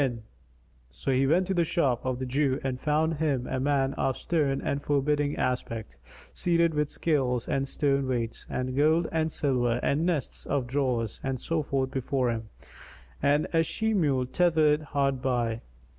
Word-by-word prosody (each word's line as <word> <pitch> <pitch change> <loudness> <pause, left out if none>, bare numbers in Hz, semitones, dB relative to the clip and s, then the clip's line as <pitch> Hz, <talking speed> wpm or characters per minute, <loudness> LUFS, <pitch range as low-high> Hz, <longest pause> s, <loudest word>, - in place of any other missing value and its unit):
[FN#251] 125 -4 0 0.7
So 100 - -3
he 135 +1 +3
went 175 +6 +3
to 190 - -1
the 175 -2 +2
shop 145 -7 0
of 130 -1 -1
the 130 - -3
Jew 135 +1 +1
and 130 -1 -2
found 155 +2 +1
him 145 -5 0
a 130 - -2
man 135 0 +1
of 135 -2 -1
stern 145 -5 0
and 140 0 -2
forbidding 145 +1 +1
aspect, 115 -3 -3 0.4
seated 170 -1 +2
with 150 -1 0
scales 130 -7 0
and 135 0 0
stone 140 -1 0
weights 120 -3 -3
and 130 0 -3
gold 155 +4 +3
and 160 -1 0
silver 125 -5 0
and 145 +3 +1
nests 170 -7 -2
of 140 -3 0
drawers 125 -4 -1
and 135 -1 -2
so 165 +4 -1
forth 135 -2 -1
before 130 -1 0
him, 110 -1 -5 0.7
and 145 +2 +3
a 165 - +4
she 220 +7 0
mule 140 -10 +2
tethered 155 0 +3
hard 140 -3 -1
by. 120 -3 0
140 Hz, 175 wpm, -28 LUFS, 130-155 Hz, 0.7 s, a